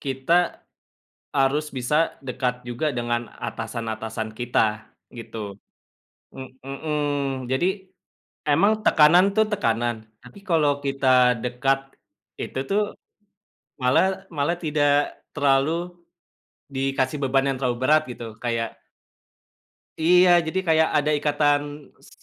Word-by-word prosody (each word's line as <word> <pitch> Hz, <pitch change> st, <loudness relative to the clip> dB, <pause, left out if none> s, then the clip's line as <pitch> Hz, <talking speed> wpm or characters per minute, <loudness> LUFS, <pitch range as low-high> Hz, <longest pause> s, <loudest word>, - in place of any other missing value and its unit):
kita 145 Hz, +6 st, 0 dB, 0.7 s
harus 140 Hz, +3 st, +2 dB
bisa 125 Hz, +4 st, -1 dB, 0.3 s
dekat 125 Hz, -1 st, -2 dB
juga 135 Hz, +5 st, -1 dB
dengan 120 Hz, -1 st, -1 dB, 0.2 s
atasan-atasan 110 Hz, -1 st, -4 dB
kita 110 Hz, -3 st, 0 dB, 0.3 s
gitu. 110 Hz, -3 st, -7 dB, 0.8 s
Eee, 130 Hz, -1 st, -8 dB, 0.2 s
mhm, 140 Hz, -2 st, -2 dB
jadi 150 Hz, +8 st, +2 dB, 0.8 s
emang 200 Hz, +9 st, +4 dB
tekanan 165 Hz, +4 st, +6 dB
tuh 220 Hz, 0 st, +4 dB
tekanan, 120 Hz, -, 0 dB, 0.2 s
tapi 125 Hz, +11 st, -15 dB
kalau 150 Hz, -4 st, +2 dB
kita 130 Hz, -2 st, +3 dB
dekat 130 Hz, +2 st, +1 dB, 0.6 s
itu -, -, -5 dB
tuh, 210 Hz, +2 st, +3 dB, 1.0 s
malah 190 Hz, +10 st, +2 dB
malah 150 Hz, +3 st, 0 dB
tidak 150 Hz, -2 st, +2 dB, 0.5 s
terlalu 140 Hz, 0 st, +3 dB, 1.0 s
dikasih 135 Hz, +1 st, -1 dB
beban 135 Hz, 0 st, +2 dB
yang 130 Hz, -, -5 dB
terlalu 125 Hz, -2 st, 0 dB
berat 155 Hz, +3 st, +4 dB
gitu. 115 Hz, -2 st, -8 dB
Kayak 115 Hz, -2 st, -2 dB, 1.2 s
Iya 180 Hz, +2 st, +5 dB, 0.2 s
jadi 185 Hz, +4 st, -1 dB
kayak 160 Hz, 0 st, +4 dB
ada 150 Hz, +1 st, +1 dB
ikatan 145 Hz, 0 st, +2 dB, 0.5 s
s -, -, -16 dB
135 Hz, 105 wpm, -24 LUFS, 125-150 Hz, 1.2 s, tekanan